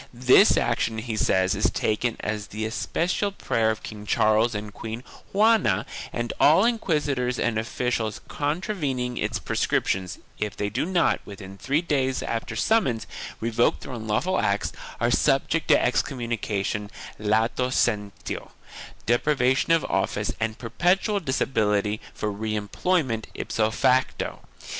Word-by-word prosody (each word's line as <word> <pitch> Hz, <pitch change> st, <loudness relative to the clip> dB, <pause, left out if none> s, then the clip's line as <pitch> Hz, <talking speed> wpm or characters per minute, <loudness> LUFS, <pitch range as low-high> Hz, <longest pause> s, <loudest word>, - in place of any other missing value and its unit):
This 130 Hz, -, +6 dB
action, 115 Hz, -1 st, 0 dB
he 110 Hz, 0 st, -3 dB
says, 95 Hz, -3 st, +2 dB
is -, -, +2 dB
taken 110 Hz, +2 st, -1 dB
at 105 Hz, -1 st, -3 dB
the 110 Hz, +1 st, -4 dB
especial 175 Hz, -, -1 dB
prayer 115 Hz, -, 0 dB
of 110 Hz, -, -3 dB
King 105 Hz, -1 st, -8 dB
Charles 110 Hz, +3 st, +3 dB
and 105 Hz, 0 st, -5 dB
Queen 115 Hz, +2 st, -6 dB, 0.3 s
Juana 210 Hz, -, +3 dB, 0.3 s
and 120 Hz, 0 st, -3 dB
all 160 Hz, +8 st, +6 dB
inquisitors 145 Hz, -, 0 dB
and 110 Hz, -1 st, 0 dB
officials 115 Hz, -1 st, -2 dB
contravening 145 Hz, -, -2 dB
its -, -, -1 dB
prescriptions, 95 Hz, -1 st, -1 dB, 0.2 s
if 105 Hz, -2 st, -3 dB
they 105 Hz, -, -1 dB
do 125 Hz, +9 st, -1 dB
not, 180 Hz, -3 st, +2 dB
within 95 Hz, -1 st, -10 dB
three 140 Hz, -, 0 dB
days 135 Hz, -5 st, 0 dB
after 115 Hz, -1 st, -3 dB
summons, 135 Hz, -, +1 dB, 0.3 s
revoke 115 Hz, +1 st, +1 dB
their 130 Hz, -, -7 dB
unlawful 115 Hz, -, 0 dB
acts, 100 Hz, +1 st, 0 dB, 0.3 s
are -, -, +2 dB
subject -, -, +2 dB
to -, -, +6 dB
excom 135 Hz, -, 0 dB
munication 105 Hz, -3 st, -2 dB, 0.3 s
latcu 110 Hz, +4 st, +1 dB, 0.6 s
se7ilentio3, -, -, -4 dB, 0.6 s
deprivation 130 Hz, +3 st, +2 dB
of 165 Hz, -2 st, +4 dB
office -, -, -1 dB
and 110 Hz, 0 st, -2 dB
perpetual 180 Hz, -, +1 dB
dis 130 Hz, -7 st, -2 dB
ability 105 Hz, -3 st, +1 dB
for 105 Hz, -, -3 dB
re 110 Hz, +1 st, -3 dB
employment, 115 Hz, -, 0 dB
ipso 110 Hz, -1 st, 0 dB
facto. 130 Hz, +3 st, +1 dB
115 Hz, 135 wpm, -25 LUFS, 110-140 Hz, 0.6 s, This